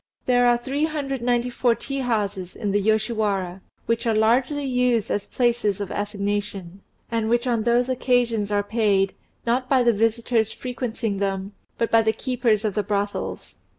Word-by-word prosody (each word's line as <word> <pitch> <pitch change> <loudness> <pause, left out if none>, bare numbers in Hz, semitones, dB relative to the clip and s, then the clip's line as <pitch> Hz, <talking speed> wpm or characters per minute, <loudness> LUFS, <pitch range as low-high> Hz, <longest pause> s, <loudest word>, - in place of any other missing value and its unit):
There 245 -1 +4
are 240 0 +4
394 255 -3 0
tea 275 +3 -4
houses 205 -7 -2
in 205 - -2
the 205 +1 +2
Yoshiwara, 210 -4 0 0.2
which 230 +1 0
are 225 - +2
largely 250 +7 +2
used 250 -4 +1
as 205 - -1
places 235 -5 +1
of 200 -2 -4
assignation, 200 -2 -3 0.3
and 225 -1 0
which 240 +2 +2
on 235 -3 +1
those 240 +2 +2
occasions 245 -5 +1
are 205 0 +2
paid, 205 -3 +1 0.3
not 250 +2 0
by 260 -2 +4
the 235 -1 +4
visitors 225 +1 +1
frequenting 240 -4 -3
them, 195 0 -2 0.3
but 230 - -1
by 225 - +6
the 220 0 +1
keepers 240 -5 0
of 210 - 0
the 210 - +1
brothels. 205 +1 -3
225 Hz, 155 wpm, -23 LUFS, 205-245 Hz, 0.3 s, by